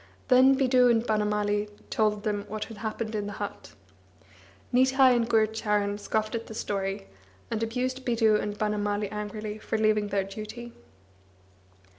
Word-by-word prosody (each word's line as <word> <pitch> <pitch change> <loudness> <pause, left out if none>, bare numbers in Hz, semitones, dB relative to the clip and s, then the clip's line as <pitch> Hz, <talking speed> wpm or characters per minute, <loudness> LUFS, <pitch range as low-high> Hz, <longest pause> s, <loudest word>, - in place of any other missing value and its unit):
Then 260 +1 +6
Bidhu 255 -2 +4
and 230 0 +2
Banamali 210 -1 0 0.2
told 210 -1 +1
them 205 -1 -2
what 215 0 -4
had 225 - -11
happened 220 +1 -4
in 205 -1 -2
the 205 - -5
hut. 205 - -7 1.0
Nitai 260 +1 +5
and 235 -1 0
Gurucharan 210 -2 +1
scoffed 215 +1 -1
at 230 -1 -4
the 220 - -8
story, 195 - -3 0.5
and 225 -1 -1
abused 255 +3 -2
Bidhu 225 -3 +3
and 205 0 -4
Banamali 205 -1 -1
angrily 210 0 -5
for 220 - -2
leaving 215 -1 +2
their 200 -1 0
duty. 215 +4 -8
215 Hz, 145 wpm, -27 LUFS, 210-230 Hz, 1.0 s, Then